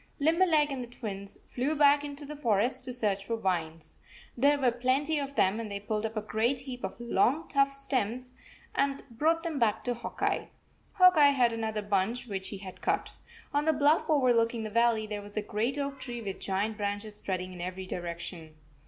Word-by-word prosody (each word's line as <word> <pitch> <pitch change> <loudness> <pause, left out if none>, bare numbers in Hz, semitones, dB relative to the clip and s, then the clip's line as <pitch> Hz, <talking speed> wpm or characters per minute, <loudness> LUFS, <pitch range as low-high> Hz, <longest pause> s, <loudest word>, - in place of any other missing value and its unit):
Limberleg 315 -1 +3
and 265 -2 -3
the - - -8
Twins 200 -5 -6
flew 270 +5 -1
back 290 0 +5
into 290 0 -6
the 300 +2 -7
forest 245 0 +1
to 255 - -4
search 210 -5 -1
for 230 - -1
vines. 165 -6 -3 0.4
There 285 +4 +4
were 260 -3 +3
plenty 265 +6 +1
of 280 0 -5
them, 195 0 +3
an 225 -2 -4
d 200 - -5
they 200 - -12
pulled 215 0 -1
up 220 0 -9
a 215 - -1
great 235 +5 0
heap 255 -2 -7
of 190 +4 -5
long, 240 +7 +1
tough 275 -1 +3
stems, 255 -3 -1 0.4
and 275 0 +2
64 235 - -19
brought 330 +2 +3
them 325 -5 -2
back 220 -2 +2
to 245 - 0
Hawk 240 - -7
Eye. - - 0 0.4
Hawk 365 -2 +6
Eye 290 -1 +8
had 245 -4 +3
another 220 -2 -2
bunch 205 +5 0
which 195 -4 -4
he 200 - -6
had 190 -1 -10
cut - - -1 0.4
On 290 +1 +1
the 315 - +4
bluff 295 +2 +3
overlooking 240 -5 +3
the 215 - -5
valley 230 -1 +3
there 210 -1 -4
was 205 +1 -11
a 215 - 0
great 225 +7 -1
oak 280 -1 -3
tree 240 -2 -5
with 195 -2 -5
giant 205 +3 -1
branches 205 0 -3
spreading 185 -2 -3
in 180 - -8
every 185 +1 -5
direction. 170 -2 -6
235 Hz, 210 wpm, -30 LUFS, 205-280 Hz, 0.4 s, Eye